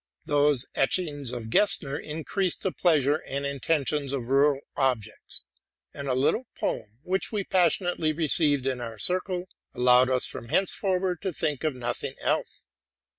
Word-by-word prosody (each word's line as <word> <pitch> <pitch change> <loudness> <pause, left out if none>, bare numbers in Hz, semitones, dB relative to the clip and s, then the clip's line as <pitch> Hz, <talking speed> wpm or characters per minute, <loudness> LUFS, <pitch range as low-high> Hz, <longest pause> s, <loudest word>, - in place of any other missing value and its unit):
Those 145 -3 +2
etchings 145 -3 0
by 120 -1 -4
Gesner 140 - +2
increased 160 +4 -2
the 190 - 0
pleasure 150 -5 +2
and 140 -2 -5
in 140 0 -3
terest 150 0 +1
in 140 -4 -2
rural 140 +2 +3
objects; 125 -6 -2 0.5
and 140 -1 -6
a 130 - +1
little 150 - +1
poem, 110 +1 -3
which 190 +2 -1
we 210 -3 -1
passion 180 -1 +2
ately 155 -3 -1
received 150 -4 +2
into 130 -2 -1
our 115 -1 -7
circle, 180 - -1 0.3
allowed 125 +1 +5
us 130 -1 +1
from 115 - -7
henceforward 185 -1 0
to 190 - -2
think 150 -3 -2
of 155 -4 0
nothing 120 -1 -3
else. - - -2
145 Hz, 155 wpm, -27 LUFS, 130-175 Hz, 0.5 s, allowed